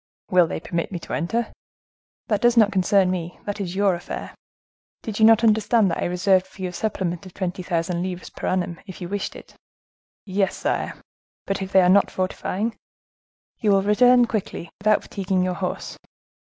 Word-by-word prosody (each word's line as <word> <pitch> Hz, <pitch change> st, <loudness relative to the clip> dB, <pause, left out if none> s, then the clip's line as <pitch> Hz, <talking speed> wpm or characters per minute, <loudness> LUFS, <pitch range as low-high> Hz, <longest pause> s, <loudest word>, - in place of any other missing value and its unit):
"Will 180 Hz, -2 st, +5 dB
they -, -, -4 dB
permit 170 Hz, +2 st, -3 dB
me 180 Hz, -, -3 dB
to 170 Hz, -, -8 dB
enter?" 230 Hz, +8 st, -1 dB, 0.7 s
"That 210 Hz, -1 st, 0 dB
does 240 Hz, 0 st, +4 dB
not 215 Hz, -2 st, +6 dB
concern 190 Hz, -1 st, +3 dB
me; 175 Hz, -1 st, -4 dB
that 205 Hz, 0 st, -3 dB
is 180 Hz, -2 st, -4 dB
your 200 Hz, -1 st, +3 dB
affair. 175 Hz, -, -6 dB, 0.7 s
Did 215 Hz, -1 st, -5 dB
you 220 Hz, -, +6 dB
not 225 Hz, +1 st, +6 dB
understand 215 Hz, -2 st, +3 dB
that -, -, -2 dB
I -, -, -1 dB
reserved 185 Hz, +1 st, +2 dB
for 190 Hz, -, -10 dB
you 185 Hz, -, -1 dB
a -, -, -10 dB
supplement 180 Hz, -3 st, -3 dB
of 180 Hz, -, -15 dB
twenty 185 Hz, -1 st, -3 dB
thousand 170 Hz, -1 st, -1 dB
livres 180 Hz, -1 st, -5 dB
per -, -, -5 dB
annum, 175 Hz, -2 st, -1 dB
if 190 Hz, -, -9 dB
you 175 Hz, -, -5 dB
wished 200 Hz, +2 st, -4 dB
it?" -, -, -13 dB, 0.7 s
"Yes, 195 Hz, 0 st, 0 dB
sire; -, -, -2 dB, 0.5 s
but 195 Hz, 0 st, -2 dB
if 190 Hz, 0 st, -5 dB
they 190 Hz, -, +6 dB
are -, -, +4 dB
not 195 Hz, +2 st, +5 dB
fortifying?" 195 Hz, +4 st, -2 dB, 0.8 s
"You 215 Hz, -, +1 dB
will 195 Hz, -1 st, +4 dB
return 245 Hz, +4 st, +5 dB
quietly, 210 Hz, -6 st, -4 dB
without 215 Hz, +1 st, +3 dB
fatiguing 190 Hz, -2 st, -1 dB
your 185 Hz, 0 st, 0 dB
horse." 180 Hz, 0 st, -4 dB
190 Hz, 190 wpm, -23 LUFS, 180-210 Hz, 0.8 s, not